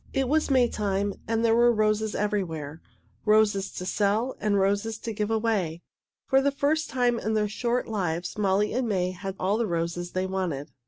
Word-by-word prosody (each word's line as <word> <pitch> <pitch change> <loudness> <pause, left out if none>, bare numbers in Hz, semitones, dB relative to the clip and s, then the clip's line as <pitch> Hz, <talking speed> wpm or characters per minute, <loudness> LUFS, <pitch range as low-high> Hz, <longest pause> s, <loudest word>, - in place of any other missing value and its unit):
It 270 -1 +1
was 310 +3 +1
Maytime, 205 -6 +1
and 225 0 +1
there 225 - +4
were 240 +1 +5
roses 215 -1 +1
everywhere 165 -8 -2 0.4
roses 210 -2 +3
to 180 - -5
sell 210 +6 0
and 205 -1 +1
roses 200 +3 +1
to 225 0 -5
give 210 0 -2
away. 215 -7 0 0.4
For 270 -1 +3
the 280 - +3
first 295 +3 0
time 245 -2 +1
in 220 0 -1
their 210 -1 +2
short 235 +4 -1
lives 180 -5 -2
Molly 205 0 +1
and 245 -1 0
May 185 -3 0
had 190 +1 -6
all 200 +4 +1
the 230 - +1
roses 170 0 -3
they 185 0 0
wanted. 180 -7 -3
210 Hz, 180 wpm, -26 LUFS, 190-230 Hz, 0.4 s, were